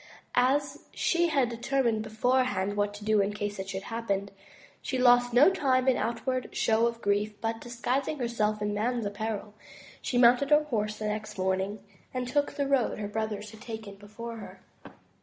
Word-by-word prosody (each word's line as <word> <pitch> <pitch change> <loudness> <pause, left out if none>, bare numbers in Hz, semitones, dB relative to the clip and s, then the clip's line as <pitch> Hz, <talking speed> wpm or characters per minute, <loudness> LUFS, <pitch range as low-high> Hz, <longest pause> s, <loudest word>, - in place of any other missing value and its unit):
As 270 +3 +2 0.2
she 345 0 +2
had 280 -6 +2
determined 235 -1 0
beforehand 220 -3 0
what 205 0 +1
to 205 0 -9
do 215 -1 +4
in 200 +1 0
case 205 -1 -4
it 190 0 -5
should 195 0 -4
so - - -10
happen, 200 -4 -2 0.5
she 260 - -2
lost 245 -1 +5
no 260 +10 +6
time 265 -8 +1
in 260 - +5
outward 255 +3 -2
show 225 +1 +3
of 235 0 -5
grief, 205 +1 0
but, 225 0 -2
disguising 250 +5 -2
herself 215 -4 -1
in 210 0 -1
man's 230 +2 -1
apparel, 210 0 -4 0.5
she 245 - -1
mounted 245 +3 +5
her 300 0 +6
horse 215 -7 -2
the 215 - -4
next 210 0 -4
morning, 190 +2 -1 0.3
and 250 -1 -2
took 285 +3 0
the 285 -1 -1
road 270 -4 +1
her 210 -1 -3
brothers 210 -1 -3
had 220 -1 -14
taken 220 -3 -7
before 215 +4 -8
her. 215 - -10
225 Hz, 180 wpm, -29 LUFS, 210-255 Hz, 0.5 s, no